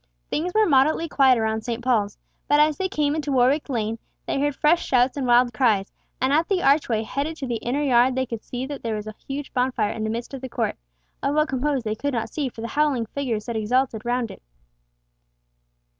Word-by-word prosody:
Things 345 +4 -1
were 435 0 +5
moderately 305 +3 +3
quiet 265 -4 +4
around 220 0 0
St. 235 0 -4
Paul's, 215 -5 +1 0.3
but 290 - +4
as 300 0 +4
they 375 +4 -2
came 295 -5 0
into 300 -2 -2
Warwick 270 +4 +2
Lane 225 -3 -2 0.3
they - - -1
heard 290 0 0
fresh 330 +5 +3
shouts 255 0 +2
and 270 -3 -2
wild 240 0 +4
cries, 215 -7 +2 0.3
and 260 +2 +1
at 320 +3 +3
the 375 -3 +1
archway 270 -6 +3
heading 280 +8 -3
to 290 - -5
the 240 -2 -2
inner 260 +6 -2
yard 250 -1 +4
they 260 0 0
could 230 -3 -6
see 250 +1 -5
that 285 0 -6
there 225 -2 -2
was 210 0 -5
a 215 - -7
huge 275 +1 -5
bonfire 250 -4 0
in 220 - -4
the 220 - -1
midst 235 +4 -4
of 270 - -6
the 260 - -6
court—of - - -4
what 305 +1 +2
composed 265 -1 -1
they 215 - 0
could 280 +5 -3
not 230 -1 -2
see 285 -4 -2
for 225 - -10
the 230 - -4
howling 285 -3 +1
figures 230 -3 -3
that 235 - -4
exulted 220 +1 0
round 240 -1 -1
it. - - -12
255 Hz, 220 wpm, -24 LUFS, 230-285 Hz, 0.3 s, were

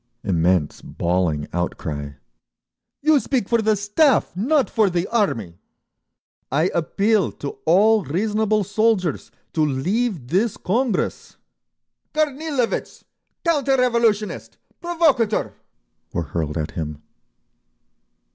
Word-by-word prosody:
Immense 90 -4 +1
bawling 85 -4 -1
outcry. 75 -4 -3 0.9
"You 310 -1 +5
speak 255 -6 -1
for 235 -1 +2
the 215 0 +2
Staff—not 250 - +2
for 215 -4 +2
the 175 0 -1
Army!" 115 - -1 0.9
"I 155 +7 +2
appeal 200 +5 +1
to 140 - -7
all 210 +5 +5
reasonable 210 +6 0
soldiers 205 -3 0 0.2
to 155 - +1
leave 165 - -1
this 200 +7 +1
Congress!" 230 +2 -1 0.8
"Kornilovitz! 300 -4 -1 0.4
Counter 280 -5 +2
revolutionist! 235 -4 0 0.2
Provocator!" 315 -11 +1 0.6
were 85 - -1
hurled 80 0 -3
at 75 -1 -3
him. 75 -2 -5
205 Hz, 95 wpm, -22 LUFS, -, 0.9 s, You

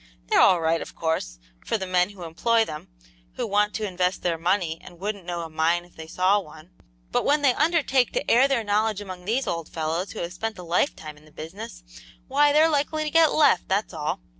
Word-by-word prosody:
They're - - +5
all 185 -2 +5
right, 165 0 +1
of - - -9
course, 160 - -2 0.3
for - - -1
the 190 - -4
men 180 0 +2
who 200 -3 -11
employ 225 +8 +1
them, 150 -4 -8 0.5
who - - -3
want 210 +1 +1
to 215 - -2
invest 180 0 -1
their 170 -2 0
money 175 -2 0
and 175 -2 -13
wouldn't 200 -2 -5
know 175 -1 -3
a 165 - -6
mine 165 +2 +1
if 175 - -23
they 160 0 -9
saw 185 +5 +2
one; 155 -1 -13 0.4
but - - +1
when 290 +1 +2
they 265 -3 +5
undertake 290 -5 +2
to - - -1
air 255 +4 +5
their 270 -5 0
knowledge 210 0 0
among 185 -3 -8
these 240 +6 0
old 165 -2 -4
fellows 165 +4 -3
who - - -7
have 170 +1 -5
spent 220 +3 -4
a 180 - -8
lifetime 165 - -1
in 150 - -19
the 155 - -19
business, 155 - -9 0.4
why, 290 +2 +3
they're 305 +2 +5
likely 310 0 0
to 305 - -3
get 325 -1 +5
left, 290 - +3
that's 200 0 -1
all. 150 - -3
185 Hz, 225 wpm, -25 LUFS, 165-230 Hz, 0.5 s, They're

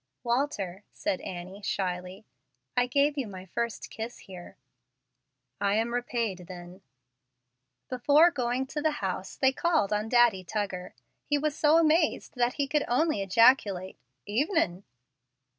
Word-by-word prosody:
"Walter," 235 -7 -1
said 290 -3 -2
Annie, 185 +2 -7
shyly, 185 0 -3 0.5
"I 245 0 +3
gave 285 +3 +2
you 255 - -2
my 185 -2 -9
first 235 +5 -4
kiss 225 +2 -6
here." 180 -3 -12 1.0
"I 200 0 +1
am 225 +2 0
repaid 230 -7 -2
then." 180 +1 -10 1.1
Before 290 +7 +4
going 250 -2 -1
to 295 +3 -4
the 310 0 +1
house, 185 0 -4
they 265 -1 +3
called 315 - +1
on 210 +1 -1
Daddy 240 -6 +4
Tuggar. 185 -1 -4 0.3
He 290 - +1
was 295 0 -1
so 310 +1 +4
amazed 320 -1 +2
that 245 0 +1
he 285 -1 -1
could 295 +1 +1
only 300 -1 +1
ejaculate, 195 -2 +3 0.3
"Evenin'." 225 - 0
235 Hz, 135 wpm, -28 LUFS, 190-285 Hz, 1.1 s, Before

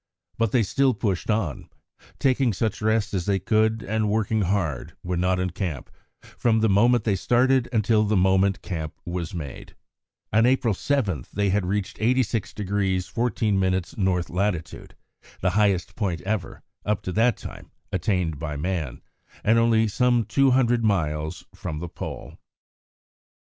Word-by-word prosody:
But 115 +1 +1
still 135 +6 +2
they - - -13
pushed 100 -3 -1
on, 105 - -1 0.5
taking 130 -3 +2
such 110 +3 -2
rest 110 -1 +1
as 90 -2 -2
they 100 -1 +2
could 110 +3 +1
and 110 0 0
working 110 0 +1
hard, 90 -8 -1
when 90 -1 -2
not 90 +1 +1
in 90 -1 -1
camp, 85 -5 -4 0.3
from 110 -2 0
the 110 - +4
moment 115 +4 +4
they 105 -3 +1
started 125 +5 +2
until 110 -1 +3
the 105 -1 +1
moment 95 +1 +2
the - - -16
camp 80 -4 -4
was 85 0 -4
made. 75 -6 -7 0.6
On 110 +3 +5
April 125 -3 +2
7 100 - -1
they 100 -1 +1
had 95 -2 0
reached 100 0 -2
86° 105 -5 0
14' 110 -4 0
N. 95 0 +2 0.5
lat., 90 -2 -1 0.7
the 95 - +2
highest 100 -2 +1
point 90 -8 -2
ever, 100 -1 -3 0.2
up 105 -2 -1
to 95 - -3
that 115 +3 +2
time, - - -10 0.2
attained 90 -4 -1
by 75 -2 -4
man, 80 -5 -3 0.4
and 115 +2 +4
only 115 -1 +3
some 120 +2 +2
two 135 +5 +3
hundred 120 -2 +3
miles 80 -7 -1
from 75 - -5
the 85 +3 -5
Pole. - - -8
100 Hz, 155 wpm, -24 LUFS, 90-115 Hz, 0.7 s, On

